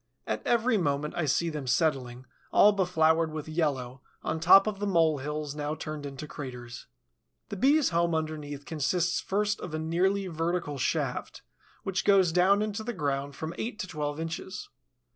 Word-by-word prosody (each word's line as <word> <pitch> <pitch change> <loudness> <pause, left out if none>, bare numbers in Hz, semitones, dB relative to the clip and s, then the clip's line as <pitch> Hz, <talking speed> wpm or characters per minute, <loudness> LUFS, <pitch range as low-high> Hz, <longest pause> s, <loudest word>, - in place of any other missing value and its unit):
At 110 0 -2
every 235 -1 +3
moment 145 -2 -1
I 165 - 0
see 165 +4 +1
them 150 -4 -5
settling, 130 -2 0 0.3
all 210 - +7
befloured 165 -4 +2
with 155 -1 -6
yellow, 135 -6 -2 0.2
on 160 +1 -2
top 180 +4 +7
of 210 -2 -3
the 205 - -1
mole 165 -5 +3
hills 150 +1 -4
now 150 0 -3
turned 155 -2 -6
into 140 +2 -7
craters. 125 -5 -8 0.6
The - - -4
Bee's 280 +8 +4
home 170 -1 +1
underneath 150 -3 -4
consists 170 +3 0
first 210 +2 -1
of 160 -3 -5
a - - -1
nearly 180 +5 +1
vertical 165 -3 -2
shaft, - - -2 0.4
which 190 -1 -1
goes 195 -4 +4
down 190 +4 +4
into 215 0 -3
the 240 +2 -3
ground 140 -4 -2
from 160 +2 -5
eight 225 -1 -3
to - - -3
twelve 150 -2 -3
inches. 170 +5 -5
160 Hz, 170 wpm, -28 LUFS, 145-190 Hz, 0.6 s, all